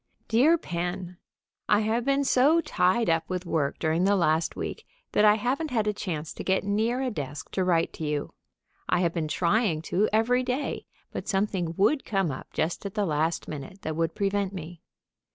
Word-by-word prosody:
_ -, -, -45 dB
DEAR 275 Hz, +10 st, +5 dB
PEN: 175 Hz, -, -4 dB, 0.5 s
I 210 Hz, 0 st, +5 dB
have 225 Hz, +2 st, 0 dB
been 275 Hz, 0 st, +2 dB
so 280 Hz, +5 st, +4 dB
tied 225 Hz, -, +1 dB
up 165 Hz, -1 st, +1 dB
with 180 Hz, 0 st, -3 dB
work 150 Hz, -5 st, 0 dB
during 160 Hz, +2 st, +1 dB
the 200 Hz, +1 st, +4 dB
last 165 Hz, -3 st, +1 dB
week -, -, -5 dB, 0.3 s
that -, -, +3 dB
I 210 Hz, 0 st, +7 dB
haven't 260 Hz, +8 st, -1 dB
had 225 Hz, -5 st, 0 dB
a 210 Hz, -, +1 dB
chance 165 Hz, -6 st, -4 dB
to -, -, -7 dB
get 190 Hz, 0 st, +1 dB
near 220 Hz, +6 st, 0 dB
a 255 Hz, -, -1 dB
desk 145 Hz, -, -6 dB
to 190 Hz, -, 0 dB
write 170 Hz, -2 st, +1 dB
to -, -, -7 dB
you. 150 Hz, -1 st, -2 dB, 0.6 s
I 180 Hz, -, +3 dB
have 170 Hz, -2 st, +1 dB
been 165 Hz, -3 st, -1 dB
trying 170 Hz, 0 st, +1 dB
to 205 Hz, +4 st, +3 dB
every 230 Hz, +4 st, +3 dB
day, 255 Hz, +3 st, -3 dB, 0.2 s
but -, -, -6 dB
something 190 Hz, -5 st, 0 dB
would 245 Hz, +8 st, +3 dB
come 195 Hz, -6 st, 0 dB
up 130 Hz, -, -8 dB
just 160 Hz, +2 st, -2 dB
at 200 Hz, 0 st, -6 dB
the 210 Hz, -2 st, +1 dB
last 160 Hz, 0 st, 0 dB
minute 155 Hz, +6 st, -8 dB
that 155 Hz, -, -3 dB
would 165 Hz, 0 st, -1 dB
prevent 200 Hz, -1 st, 0 dB
me. 175 Hz, -2 st, -8 dB
190 Hz, 200 wpm, -27 LUFS, 165-220 Hz, 0.6 s, I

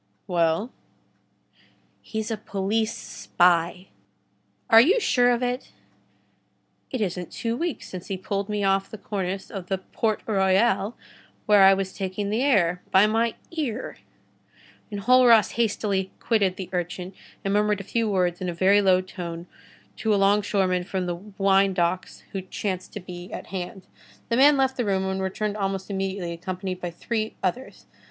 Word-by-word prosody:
"Well?" 170 Hz, +6 st, +1 dB, 1.3 s
"He's 220 Hz, 0 st, -4 dB
a -, -, 0 dB
police 215 Hz, +2 st, -1 dB
spy." 175 Hz, +1 st, +1 dB, 0.8 s
"Are 225 Hz, -, +8 dB
you 380 Hz, -, +4 dB
sure 245 Hz, -, +3 dB
of 245 Hz, 0 st, +1 dB
it?" 250 Hz, +1 st, -3 dB, 1.2 s
"It 255 Hz, -, -3 dB
isn't 180 Hz, -3 st, -3 dB
two 230 Hz, -1 st, -2 dB
weeks 335 Hz, +4 st, -3 dB
since 185 Hz, -1 st, -8 dB
he 195 Hz, -, -3 dB
pulled 200 Hz, +2 st, -3 dB
me 210 Hz, -1 st, -1 dB
off 195 Hz, 0 st, +1 dB
the 220 Hz, -, -8 dB
cornice 195 Hz, -2 st, -4 dB
of 190 Hz, -3 st, -6 dB
the 190 Hz, -, 0 dB
Port 215 Hz, +3 st, -2 dB
Royal, 195 Hz, +1 st, +2 dB, 0.5 s
where 210 Hz, -1 st, +6 dB
I 195 Hz, 0 st, +8 dB
was 190 Hz, -1 st, -3 dB
taking 195 Hz, +1 st, -3 dB
the 220 Hz, +3 st, +1 dB
air, 180 Hz, -10 st, +2 dB
by 190 Hz, +2 st, +6 dB
my 225 Hz, +1 st, +1 dB, 0.2 s
ear." 270 Hz, -8 st, -4 dB, 0.9 s
Enjolras 230 Hz, +2 st, +5 dB
hastily 205 Hz, -4 st, 0 dB
quitted 200 Hz, -5 st, +1 dB
the 190 Hz, -2 st, -7 dB
urchin 180 Hz, +1 st, -3 dB, 0.3 s
and 195 Hz, -, +1 dB
murmured 210 Hz, 0 st, +2 dB
a -, -, -6 dB
few 225 Hz, +3 st, -1 dB
words 180 Hz, -3 st, 0 dB
in 180 Hz, -, -2 dB
a 170 Hz, -, -4 dB
very 195 Hz, +4 st, +4 dB
low 185 Hz, -2 st, +4 dB
tone 175 Hz, -2 st, -7 dB, 0.5 s
to 215 Hz, -1 st, +1 dB
a -, -, +2 dB
longshoreman 195 Hz, -2 st, +2 dB
from 185 Hz, 0 st, -3 dB
the 175 Hz, -1 st, -3 dB, 0.2 s
winedocks 190 Hz, -2 st, +1 dB
who 195 Hz, -, -3 dB
chanced 185 Hz, 0 st, -4 dB
to -, -, -5 dB
be 180 Hz, -1 st, -9 dB
at -, -, -6 dB
hand. 185 Hz, 0 st, -5 dB, 0.4 s
The 230 Hz, -, +1 dB
man 285 Hz, +2 st, +6 dB
left 265 Hz, -1 st, +1 dB
the 245 Hz, -, 0 dB
room, 190 Hz, -2 st, +1 dB
and 190 Hz, 0 st, -2 dB
returned 205 Hz, +2 st, -2 dB
almost 195 Hz, 0 st, -3 dB
immediately, 190 Hz, -2 st, -3 dB
accompanied 185 Hz, +1 st, -5 dB
by 175 Hz, -, -3 dB
three 220 Hz, +5 st, -3 dB
others. 240 Hz, +8 st, -3 dB
195 Hz, 160 wpm, -25 LUFS, 185-220 Hz, 1.3 s, Are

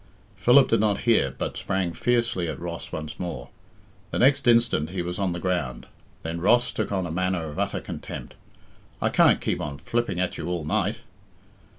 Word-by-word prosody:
Philip 130 Hz, +2 st, +6 dB
did 115 Hz, -, +3 dB
not 105 Hz, -1 st, +1 dB
hear, 70 Hz, -, +2 dB
but -, -, -3 dB
sprang 95 Hz, -3 st, -1 dB
fiercely 120 Hz, -7 st, +1 dB
at 75 Hz, -4 st, -4 dB
Ross 85 Hz, 0 st, -6 dB
once 80 Hz, -1 st, -6 dB
more. 85 Hz, -9 st, -5 dB, 0.6 s
The -, -, -3 dB
next 135 Hz, +1 st, +4 dB
instant 115 Hz, -10 st, +4 dB
he 90 Hz, -1 st, -3 dB
was 90 Hz, +2 st, -4 dB
on 95 Hz, -2 st, +1 dB
the 85 Hz, -, -3 dB
ground. 80 Hz, -9 st, -2 dB, 0.4 s
Then 85 Hz, +1 st, -4 dB
Ross 120 Hz, +6 st, +4 dB
took 110 Hz, -, -3 dB
on 95 Hz, -2 st, 0 dB
a 85 Hz, -, -4 dB
manner 90 Hz, -2 st, -1 dB
of 75 Hz, -, -7 dB
utter -, -, -1 dB
contempt. -, -, -7 dB, 0.7 s
"I -, -, +1 dB
can't -, -, +5 dB
keep -, -, -1 dB
on 70 Hz, -1 st, -4 dB
flipping 115 Hz, +3 st, -2 dB
at 90 Hz, -1 st, -1 dB
you -, -, -4 dB
all 85 Hz, -3 st, -2 dB
night." -, -, 0 dB
90 Hz, 190 wpm, -25 LUFS, 80-115 Hz, 0.7 s, Philip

